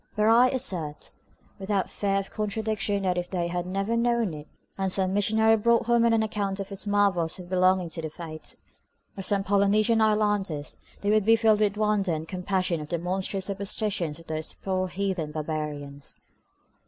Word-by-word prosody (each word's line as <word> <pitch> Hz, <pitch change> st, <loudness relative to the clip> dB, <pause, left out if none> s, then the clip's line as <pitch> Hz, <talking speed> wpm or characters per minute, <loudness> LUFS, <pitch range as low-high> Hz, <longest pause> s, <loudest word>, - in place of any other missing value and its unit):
But 210 Hz, -1 st, +2 dB
I 230 Hz, +3 st, +6 dB
assert, 170 Hz, -, -2 dB, 0.5 s
without 195 Hz, 0 st, -1 dB
fear 200 Hz, -1 st, -1 dB
of 195 Hz, 0 st, -3 dB
contradiction, 210 Hz, -1 st, -1 dB
that 180 Hz, -1 st, +1 dB
if 175 Hz, -, -5 dB
they 175 Hz, -2 st, -2 dB
had 175 Hz, 0 st, -3 dB
never 195 Hz, +4 st, -1 dB
known 235 Hz, -5 st, +1 dB
it, 150 Hz, 0 st, -9 dB, 0.3 s
and 190 Hz, -1 st, -1 dB
some 190 Hz, 0 st, +1 dB
missionary 220 Hz, +2 st, +4 dB
brought 235 Hz, +2 st, +2 dB
home 235 Hz, 0 st, +3 dB
an 225 Hz, -1 st, +3 dB
account 205 Hz, -2 st, -2 dB
of 195 Hz, 0 st, -6 dB
its 195 Hz, +1 st, -4 dB
marvels 195 Hz, -5 st, +1 dB
as 180 Hz, -, -8 dB
belonging 185 Hz, -1 st, +2 dB
to 165 Hz, -, -5 dB
the 160 Hz, -, -4 dB
faith 155 Hz, -1 st, -8 dB, 0.6 s
of 195 Hz, -, -5 dB
some 200 Hz, 0 st, +1 dB
Polynesian 205 Hz, +3 st, +3 dB
islanders, 205 Hz, -8 st, 0 dB, 0.2 s
they 205 Hz, -, +1 dB
would 215 Hz, -1 st, +3 dB
be 225 Hz, +3 st, +5 dB
filled 220 Hz, -2 st, +3 dB
with 210 Hz, -1 st, +1 dB
wonder 210 Hz, -4 st, +1 dB
and 160 Hz, +1 st, -4 dB
compassion 185 Hz, -2 st, -1 dB
at 150 Hz, -, -8 dB
the 170 Hz, -, -1 dB
monstrous 185 Hz, +2 st, -2 dB
superstitions 195 Hz, -4 st, -1 dB
of 165 Hz, -, -14 dB
those 155 Hz, -1 st, -3 dB
poor 185 Hz, -1 st, -2 dB
heathen 185 Hz, -4 st, -2 dB
barbarians. 150 Hz, -2 st, -5 dB
195 Hz, 180 wpm, -26 LUFS, 175-210 Hz, 0.6 s, I